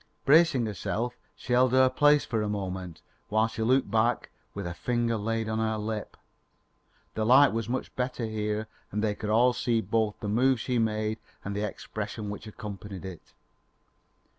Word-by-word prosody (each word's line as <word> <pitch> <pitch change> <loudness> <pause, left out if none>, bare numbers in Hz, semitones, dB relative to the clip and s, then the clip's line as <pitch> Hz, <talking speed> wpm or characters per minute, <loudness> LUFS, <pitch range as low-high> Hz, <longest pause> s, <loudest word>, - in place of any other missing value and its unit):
Bracing 150 -4 +5
herself, 110 +3 -2 0.2
she 125 - -4
held 125 0 +4
her 130 0 +6
place 145 +3 +4
for 115 -3 -1
a 105 - -1
moment, 95 -4 -4 0.3
while 110 +1 +3
she 115 0 -6
looked 125 -1 +2
back, 115 +1 +1 0.2
with 100 -1 -4
a 85 - -3
finger 120 +4 0
laid 115 +1 -1
on 110 0 -1
her 110 -1 0
lip. 105 0 -4 1.0
The 110 - -1
light 130 +4 +6
was 115 0 -2
much 130 +1 -3
better 125 -1 -2
here 110 0 -2 0.2
and 105 +2 -1
they 105 -1 +1
could 105 +1 -5
all 120 +3 +4
see 120 -2 +1
both 110 0 0
the 105 - -5
move 125 +4 +3
she 125 +1 0
made 110 -1 0 0.3
and 100 0 -3
the 105 +1 -1
expression 105 +1 -5
which 105 +1 -8
accompanied 100 -4 -8
it. 90 -4 -10
110 Hz, 175 wpm, -28 LUFS, 105-120 Hz, 1.0 s, her